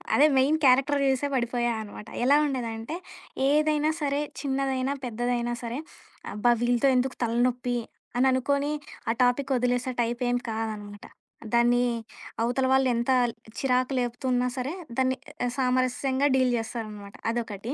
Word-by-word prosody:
అదే 295 - +6
main 275 +4 +4
character 275 +3 +4
చూసే 265 +1 +1
పడిపోయా 240 -1 0
అనమాట. 210 0 -10 0.2
ఎలా 280 +3 +6
ఉండేదంటే 235 -1 -3 0.6
ఏదైనా 305 +1 +3
సరే 285 -1 0 0.2
చిన్నదైనా 270 -1 -1
పెద్దదైనా 240 +1 -1
సరే 235 +3 -4 0.5
అబ్బా! 210 +4 +2
వీళ్ళతో 245 +2 +3
ఎందుకు 255 +1 0
తలనొప్పి 245 +1 +1 0.4
అని 255 +2 +3
అనుకోని 280 +3 +1 0.4
ఆ‌ - - +4
టాపిక్ 255 +2 +2
వదిలేసే 245 +1 0
టైపేం 240 +1 0
కాదనమాట. 215 -2 -5 0.5
దాన్ని 240 +1 +4 0.6
అవతల 245 +3 +1
వాళ్ళు 265 0 +4
ఎంత 235 +2 0 0.5
చిరాకు 255 0 +1
లేపుతున్నా 250 +1 0
సరే 260 +3 -2 0.3
దాన్ని 260 0 +2 0.3
ఆహ్, 240 - -2
సామరస్యంగా 255 +2 +1
డీల్ 255 -2 +3
జేస్తారనమట. 215 -3 -6
అదొకటి. 230 0 -4
250 Hz, 125 wpm, -27 LUFS, 235-265 Hz, 0.6 s, అదే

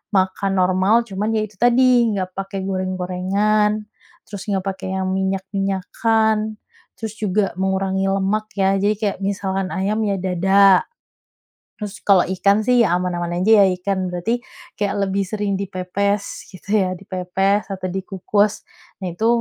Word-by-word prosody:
makan 190 +1 +1
normal, 190 +5 +3
cuman 205 +3 -2
ya 215 - +1
itu 210 - -22
tadi, 245 -1 +4
enggak 185 -1 -3
pakai 195 0 -4
goreng-gorengan, 190 +3 0 0.4
terus 200 -2 -7
enggak 195 -1 -1
pakai 190 0 -5
yang 190 0 -1
minyak-minyakkan, 195 +3 0 0.4
terus 220 -2 -4
juga 205 -1 0
mengurangi 190 0 0
lemak 195 +2 0
ya, 195 0 +3
jadi 205 +2 +2
kayak 205 -4 -1
misalkan 195 -1 -1
ayam 200 +3 0
ya 200 - +1
dada, 190 +1 +4 0.9
terus 210 -1 -6
kalau 195 -3 +5
ikan 200 +3 +2
sih 245 -2 +4
aman-aman 175 0 -1
aja 210 -1 +6
ya - - +5
ikan, 190 -1 -1
berarti 215 +7 -1 0.4
kayak 205 -1 0
lebih 195 +1 0
sering 205 -1 -2
dipepes 200 +2 -2
gitu 185 +1 -14
ya, 185 0 -1
dipepes 195 +1 -1
atau 185 -1 -4
dikukus 195 +2 0 0.5
nah 185 - -2
itu. 220 +6 -1
195 Hz, 140 wpm, -20 LUFS, 185-210 Hz, 0.9 s, aja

